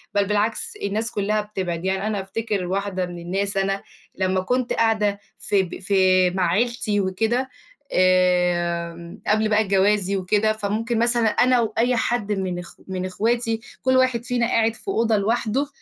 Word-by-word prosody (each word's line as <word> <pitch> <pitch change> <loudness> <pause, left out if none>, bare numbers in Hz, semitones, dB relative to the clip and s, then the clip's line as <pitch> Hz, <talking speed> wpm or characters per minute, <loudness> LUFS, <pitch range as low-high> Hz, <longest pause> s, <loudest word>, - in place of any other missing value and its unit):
بل 200 0 +3
بالعكس 210 +2 -1
الناس 215 +4 -1
كلّها 210 +1 0
بتبعد. 185 -5 -4
يعني 190 +2 0
أنا 210 -2 -1
أفتكر 205 -1 -3
واحدة 190 0 -2
من 175 -1 -8
الناس، 195 +3 -2
أنا 195 0 0 0.3
لمّا 185 0 0
كنت 250 +5 0
قاعدة 215 -3 +1 0.2
في 200 -2 +1
ب 175 - -7
في 185 -1 +3
مع 180 0 0
عيلتي 215 0 0
وكده، 225 +7 0 0.4
آمم، 175 -2 +1
قبل 215 +1 +2
بقى 215 0 +3
جوازي 195 0 +2
وكده، 210 +3 +1
فممكن 220 +2 -2
مثلًا 235 -1 +2
أنا 250 +3 +3
وأي 230 +2 +1
حد 240 -3 -1
من 190 -3 -2
أخو 175 - -12
من 185 -1 -3
أخواتي 225 +4 0 0.2
كل 260 0 +3
واحد 255 -3 +2
فينا 245 -1 0
قاعد 225 -1 +2
في 225 - -17
أوضة 230 - +2
لوحده، 230 +6 0
205 Hz, 160 wpm, -23 LUFS, 185-225 Hz, 0.4 s, بل